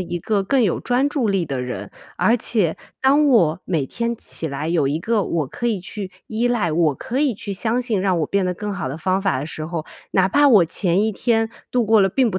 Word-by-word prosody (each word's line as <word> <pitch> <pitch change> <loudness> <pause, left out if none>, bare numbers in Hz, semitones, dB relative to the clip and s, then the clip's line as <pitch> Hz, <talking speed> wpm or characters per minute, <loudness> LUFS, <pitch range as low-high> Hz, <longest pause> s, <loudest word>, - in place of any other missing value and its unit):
一 175 -1 -3
个 200 +3 0
更 250 +6 +2
有 195 - +1
专 250 +3 +1
注 280 -6 0
力 195 -3 +1
的 135 -4 -3
人， 125 0 -5 0.3
而 230 - +3
且 210 -8 0 0.3
当 285 +3 +4
我 175 - +3
每 160 -6 0
天 235 - -3
起 165 - -4
来 140 +2 -4
有 165 -5 +1
一 145 +3 -1
个 220 +4 0
我 165 -5 -1
可 240 - -4
以 225 -4 0
去 195 +1 -6 0.2
依 230 +2 0
赖， 210 -9 0
我 160 -2 +2
可 245 - -4
以 280 -4 +2
去 200 0 -6
相 225 +5 0
信 225 -6 0
让 185 -2 +1
我 155 - 0
变 195 +2 0
得 180 - -1
更 210 +3 -4
好 175 -8 -3
的 135 - -5
方 185 +4 0
法 195 -8 0
的 135 - -3
时 155 0 -6
候， 165 -2 -4 0.3
哪 190 0 +3
怕 290 +7 +4
我 210 -9 +6
前 180 +3 +1
一 220 - 0
天 225 +1 0 0.2
度 245 -2 +1
过 220 0 +4
了 195 - +4
并 245 +4 +2
不 185 - -2
195 Hz, 265 characters per minute, -21 LUFS, 170-235 Hz, 0.3 s, 我